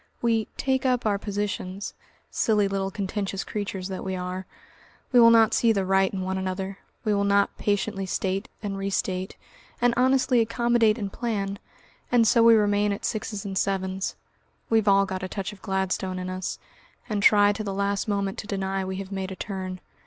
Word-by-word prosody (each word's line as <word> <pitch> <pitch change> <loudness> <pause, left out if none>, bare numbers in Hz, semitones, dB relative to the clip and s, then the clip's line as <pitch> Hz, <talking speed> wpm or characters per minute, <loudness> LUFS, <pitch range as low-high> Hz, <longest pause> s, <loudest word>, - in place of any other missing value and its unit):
We 225 -2 +1
"take 265 -1 0
up 250 -3 +1
our 205 -2 +1
positions," 200 -1 -4 0.4
silly 210 -3 +2
little 195 0 -1
contentious 195 -1 -3
creatures 200 -3 -4
that 190 - -5
we 190 -1 -3
are, 185 +1 -5 0.6
we 250 - +6
will 230 -1 +9
not 225 -1 +5
see 230 - +4
the 195 -3 0
right 190 0 +3
in 190 - -3
one 190 0 -2
another, 190 +1 -4 0.3
we 215 - +2
will 200 0 +1
not 200 0 +2
patiently 205 -1 -1
state 190 +3 -2
and 195 -1 -3
restate, 190 -1 -2 0.4
and 245 0 +3
honestly 255 0 +3
accommodate 230 -1 +2
and 200 -3 -4
plan, 200 -4 -2 0.5
and 235 -2 +5
so 230 - +5
we 230 0 +8
remain 205 -1 +2
at 200 - -3
sixes 210 -2 -3
and 190 -1 -1
sevens. 190 -1 -1 0.6
We've 220 -2 +3
all 195 0 +5
a 185 0 -4
touch 195 +2 -4
of 200 - -16
Gladstone 190 -1 -1
in 185 0 -4
us, 185 +1 -4 0.5
and 210 -3 -1
try 205 0 +6
to 215 - -4
the 200 - -3
last 200 +1 -1
moment 200 -2 -1
to 205 - -7
deny 195 -1 -2
we 190 0 -4
have 195 0 -6
made 190 -1 -3
a - - -5
turn. 185 -2 -5
200 Hz, 185 wpm, -26 LUFS, 190-215 Hz, 0.6 s, will